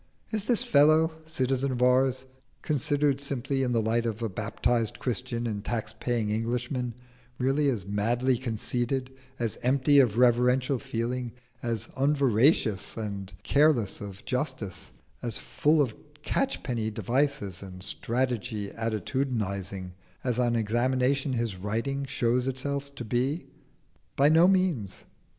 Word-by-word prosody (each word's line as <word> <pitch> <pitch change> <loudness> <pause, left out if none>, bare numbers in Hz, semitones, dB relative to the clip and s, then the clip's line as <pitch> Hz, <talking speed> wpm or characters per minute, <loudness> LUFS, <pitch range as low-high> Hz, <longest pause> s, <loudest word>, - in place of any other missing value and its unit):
Is 215 -2 -1
this 235 -1 +3
fellow 155 +3 +5 0.2
citizen 135 -2 0
of 125 -1 0
ours, 130 +1 +3 0.4
considered 145 -1 +1
simply 135 -1 -1
in 125 -2 0
the 115 -2 +1
light 115 +2 +1
of 115 0 -3
a 115 - -1
baptised 110 +3 0
Christian 120 0 -2
and 105 -3 -3
tax 110 -2 -3
paying 115 -4 -1
Englishman, 120 +2 -2 0.4
really 135 +3 +2
as 110 -9 -2
madly 115 +6 +1
conceited, 125 +2 -2 0.3
as 115 -3 -2
empty 140 +3 +4
of 120 -5 +3
reverential 125 +2 +3
feeling, 125 -1 -3 0.3
as 115 -3 -2
unveracious 135 -6 +2
and 100 -3 -5
careless 140 -8 +2
of 100 -1 -8
justice, 125 - -3 0.3
as 120 -3 0
full 150 0 +2
of 120 -5 -3 0.3
catch 270 - -1
penny 115 -3 -1
devices 120 -5 -1
and 90 -2 -8
stagey 120 -3 0
attitudinising 105 -5 -2 0.3
as 125 -2 0
on 120 -1 +2
examination 130 +5 +1
his 115 -5 -1
writing 115 +8 -2
shows 125 0 0
itself 140 +2 -3
to 120 - -6
be? 130 +8 -1 0.7
By 140 +2 +5
no 165 +3 +6
means. 180 - +1
125 Hz, 130 wpm, -28 LUFS, 110-135 Hz, 0.7 s, no